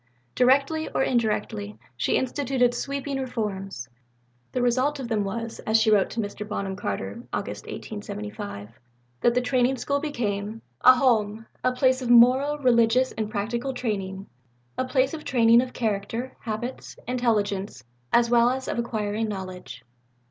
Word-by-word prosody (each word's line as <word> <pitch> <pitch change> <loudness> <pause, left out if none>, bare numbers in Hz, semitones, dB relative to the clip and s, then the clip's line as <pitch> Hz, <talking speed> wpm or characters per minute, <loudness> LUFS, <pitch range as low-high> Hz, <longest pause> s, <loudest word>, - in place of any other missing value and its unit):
Directly 275 +5 +3
or - - 0
indirectly, 210 - -1 0.2
she 120 - +1
instituted 260 -2 +1
sweeping 275 +2 -3
reforms. 195 - -4 0.6
The - - -1
result 260 +4 +1
of 260 - -4
them 215 -3 +1
was, 230 +3 -4
as 220 +1 +2
she 220 0 +3
wrote 205 -2 +4
to 235 - -5
Mr. 205 -1 -4
Bonham 195 -2 -3
Carter 100 - -4
(Aug. - - -2
1875), 105 +1 -7 0.4
that 240 - +3
the 250 - +3
Training 255 +1 +1
School 280 +3 -1
became 225 -7 -3 0.2
"a 255 +1 +9
Home 225 -4 +1 0.2
a 255 - +3
place 255 +1 +2
of 245 - -3
moral, 255 +5 +6
religious 250 -1 +3
and 215 -1 -3
practical 235 +5 -2
training 195 -5 -3 0.5
a 255 - -1
place 260 +1 +1
of 310 -1 -6
training 235 -1 +5
of 255 0 -5
character, 225 +3 -3
habits, 240 +3 -5
intelligence, 210 - -1 0.3
as 235 0 +4
well 235 0 +4
as 260 +1 -3
of - - -2
acquiring 220 -2 -2
knowledge." 185 -2 -7
235 Hz, 150 wpm, -25 LUFS, 205-255 Hz, 0.6 s, a